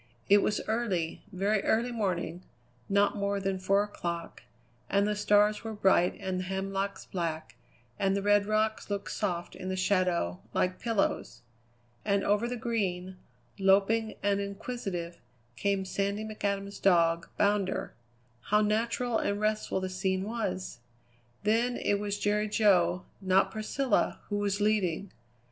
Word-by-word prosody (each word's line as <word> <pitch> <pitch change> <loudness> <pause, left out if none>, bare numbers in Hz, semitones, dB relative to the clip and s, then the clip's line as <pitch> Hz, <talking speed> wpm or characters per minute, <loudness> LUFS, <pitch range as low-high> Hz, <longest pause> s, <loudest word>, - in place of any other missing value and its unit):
It 205 +1 +8
was 210 - 0
early, 205 -8 -1
very 200 +2 +1
early 235 +2 +1
morning, 185 -6 -2 0.5
not 200 0 +3
more 200 0 -1
than 195 -1 -1
four 195 +2 +3
o'clock, 170 -5 -5 0.5
and 200 0 +3
the 210 0 0
stars 210 +1 +3
were 225 -1 -4
bright 190 -3 +3
and 190 -2 -2
the - - -2
hemlocks 195 +1 -3
black, 160 -9 -4 0.4
and 195 0 +2
the 200 - -2
red 205 0 +4
rocks 215 0 0
looked 200 -1 -3
soft 175 -4 -2
in 185 - -6
the 190 - -1
shadows, 185 - +1 0.2
like 185 0 +1
pillows. 225 - -1 0.6
And 200 -1 +1
over 210 +3 +2
the 245 0 -3
Green, 190 -6 -2 0.4
loping 200 +3 +3
and 200 0 +2
inquisitive, 200 -4 -5 0.4
came 200 +2 0
Sandy 200 +3 -1
McAdam's 200 -2 -3
dog, 170 -3 +3
Bounder. 200 -2 +1 0.5
How 210 0 +3
natural 230 +2 +1
and 205 0 -1
restful 215 -2 0
the 185 - -2
scene 190 0 -1
was! 210 - -3 0.6
Then 230 +4 +2
it 205 - +1
was 205 0 -2
Jerry 210 +1 +1
Jo, 185 -5 +3 0.2
not 190 0 +3
Priscilla, 235 +5 0
who 205 - -1
was 200 0 0
leading. 200 -3 +1
200 Hz, 140 wpm, -30 LUFS, 185-210 Hz, 0.6 s, It